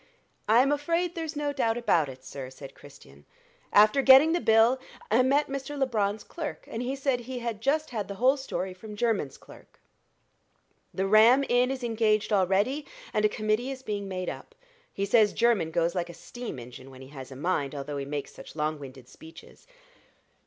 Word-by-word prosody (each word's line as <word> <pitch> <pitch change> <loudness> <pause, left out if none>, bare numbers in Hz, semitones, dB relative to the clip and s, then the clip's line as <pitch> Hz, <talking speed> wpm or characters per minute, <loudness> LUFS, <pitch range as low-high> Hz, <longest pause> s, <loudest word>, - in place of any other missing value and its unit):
"I'm 250 +5 +5
afraid 335 +4 0
there's 325 -3 -5
no 290 -1 -2
doubt 230 -4 0
about 170 - +2
it, 130 0 -12
sir," 130 -1 -7
said 135 +1 -11
Christian. 75 - -16 0.5
"After 215 +6 +5
getting 270 +4 +7
the 345 - +1
bill, 225 +3 +4 0.3
I 230 +4 +5
met 280 +3 +3
Mr. 275 +1 -5
Labron's 215 -6 0
clerk, 320 -4 -7
and 225 - -5
he 255 +2 -2
said 270 -2 0
he 250 +1 -7
had 235 -3 -4
just 305 +4 0
had 215 -5 -3
the 200 - -6
whole 255 +6 +3
story 225 -9 -4
from 210 +3 -10
Jermyn's 210 - -1
clerk. - - -17 1.1
The 190 - -2
Ram 225 +7 +6
Inn 245 +1 +3
is 265 -1 -4
engaged 220 -2 +1
already, 200 +9 +1 0.3
and 210 - +1
a - - +4
committee 215 +4 -1
is 265 -1 -7
being 205 -3 -4
made 185 -1 -4
up. 475 - -7 0.4
He 200 - -2
says 210 0 +4
Jermyn 230 -9 +2
goes 170 +1 0
like 175 -2 -3
a 170 - -9
steam 240 - -8
engine, 125 +2 -11
when 130 0 -12
he 130 - -13
has 135 -3 -10
a - - -8
mind, 145 -1 -2
although 145 +1 -5
he 140 - -4
makes 145 0 -5
such - - -12
long 155 0 -2
winded 130 -2 -11
speeches." 160 - -15
215 Hz, 190 wpm, -27 LUFS, 165-265 Hz, 1.1 s, getting